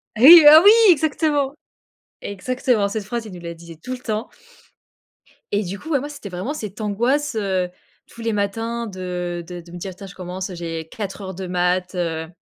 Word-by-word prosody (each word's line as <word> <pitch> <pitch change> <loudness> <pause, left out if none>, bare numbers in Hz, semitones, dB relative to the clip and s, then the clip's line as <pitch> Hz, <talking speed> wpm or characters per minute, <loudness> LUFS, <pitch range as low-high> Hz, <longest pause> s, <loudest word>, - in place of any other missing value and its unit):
Hey! 310 +9 +10
Oh 310 +2 +9
oui! 415 - +10 0.2
Exactement! 295 -3 +1 0.7
Exactement, 220 +1 -1
cette 210 0 -4
phrase, 235 +2 -4
il 215 - -9
nous 180 - -9
la 170 0 -7
disait 165 0 -12
tout 255 - -8
le 255 - -3
temps. 220 -2 -4 1.2
Et 205 +1 +1
du 190 +1 -6
coup, 315 - -10
bah 285 - +2
moi, 290 +3 -6
c'était 285 -8 -9
vraiment 185 +11 -4
cette 210 -8 -7
angoisse, 240 +7 0
heu, 190 -4 -1 0.4
tous 235 - -13
les 230 -1 -1
matins 225 +3 -2
de 180 -2 -5
de 175 -1 -8
de 170 0 -16
me 175 - -8
dire: 185 +1 -7
«Tiens, 195 - -10
je 185 - -12
commence, 185 +1 -6
j'ai 165 -2 -5
4 205 0 -6
heures 190 -1 -6
de 190 +1 -6
maths, 180 +1 0
heu» 160 -2 -2
200 Hz, 200 wpm, -21 LUFS, 180-240 Hz, 1.2 s, Hey